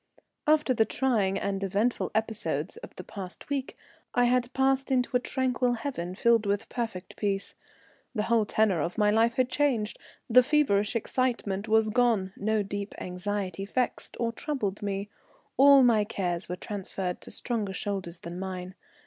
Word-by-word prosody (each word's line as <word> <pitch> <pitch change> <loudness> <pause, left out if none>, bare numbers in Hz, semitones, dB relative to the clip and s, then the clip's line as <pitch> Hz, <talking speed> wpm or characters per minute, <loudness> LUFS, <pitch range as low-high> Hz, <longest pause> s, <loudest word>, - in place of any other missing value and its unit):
After 300 -3 +4
the 225 - +4
trying 220 -6 +1
and 195 0 -2
eventful 205 +5 0
episodes 200 -8 -1
of - - -11
the - - -8
past 195 +6 -8
week 275 -2 -2 0.4
I 245 - +4
had 250 0 +2
passed 270 +1 +1
into 250 -1 +1
a - - +5
tranquil 255 -1 0
haven 225 -8 -4
filled 230 0 +3
with 200 +2 -1
perfect 225 -6 -4
peace. 200 -2 -1 0.6
The 210 - +1
whole 225 -2 +2
tenor 205 -7 +2
of 170 +4 -3
my 210 -1 +4
life 230 +2 +3
had 255 -1 +2
changed, 245 -8 +1 0.3
the 250 +2 +7
feverish 245 -7 +2
excitement 230 -4 -1
was 220 0 +3
gone, 225 -6 +2
no 215 0 0
deep 200 +1 -5
anxiety 190 +1 -3
vexed 250 +3 -2
or 235 -1 0
troubled 230 -6 -3
me, 200 0 -2 0.5
all 275 0 +8
my 225 -4 +5
cares 175 -5 -2
were 180 - -2
transferred 190 -1 -4
to - - -9
stronger 220 -5 -2
shoulders 185 -4 -3
than 170 +1 -7
mine. 185 -1 -5
215 Hz, 160 wpm, -28 LUFS, 195-245 Hz, 0.6 s, all